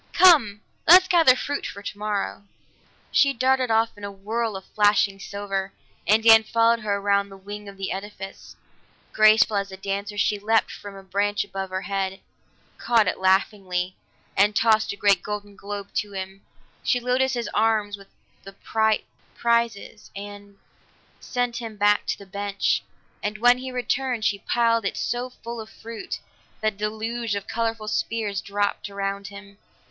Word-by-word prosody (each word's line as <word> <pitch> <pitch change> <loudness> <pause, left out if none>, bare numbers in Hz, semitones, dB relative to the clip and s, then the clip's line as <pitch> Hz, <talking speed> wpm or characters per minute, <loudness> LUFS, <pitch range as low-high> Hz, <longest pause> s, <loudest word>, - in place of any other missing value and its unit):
"Come! 270 - +6 0.3
Let's 365 +3 +9
gather 330 -9 +6
fruit 285 +2 -3
for 200 - -9
tomorrow." 205 -1 -3 0.7
She 275 -1 +4
darted 260 0 +2
off 225 0 +2
in 205 - -14
a 200 - -4
whirl 215 +3 -3
of 190 - -7
flashing 205 -1 +2
silver, 195 -1 -4 0.3
and 220 +2 +4
Dan 225 -1 +8
followed 230 +1 +3
her 210 -2 -1
around 200 0 +1
the 195 - -12
wing 205 +1 -8
of 195 - -13
the 195 -1 -3
edifice. 195 0 -8 0.6
Graceful 215 0 +5
as 200 -1 -2
a 190 - -8
dancer 200 +2 -4
she 205 0 +1
leaped 220 +2 +2
for 200 -1 -9
a 195 - -11
branch 205 +2 0
above 195 -1 -5
her 185 +1 -3
head, 195 -1 -2 0.6
caught 230 -4 +3
it - - -1
laughingly, 190 -1 +1 0.4
and 205 +2 +3
tossed 220 0 +3
a - - -5
great 200 -2 +3
golden 205 0 -6
globe 200 0 -7
to 205 -1 -2
him. 190 0 -6 0.4
She 250 - +2
loaded 255 +2 +1
his 240 -3 -2
arms 215 -2 +1
with 200 -1 -16 0.3
the 195 - -11 0.2
bright 220 -1 +2 0.3
prizes 235 -2 -1
and 205 0 -9 0.6
sent 245 -1 -2
him 225 -3 -6
back 205 0 +3
to - - -1
the 200 - -12
bench, 200 +1 -1 0.4
and 210 +1 -3
when 245 +3 +5
he 260 0 -6
returned, 250 -2 -1
she 200 -2 +1
piled 230 +1 +1
it 195 - -2
so 245 +1 -2
full 235 -2 -8
of 220 - -10
fruit 230 0 -7 0.4
that 215 -1 0
a - - -25
deluge 220 +1 -2
of 200 -1 -4
colorful 225 -1 -2
spheres 215 -2 -1
dropped 205 +1 -2
around 200 0 -3
him. 200 0 -12
205 Hz, 165 wpm, -24 LUFS, 200-230 Hz, 0.7 s, Let's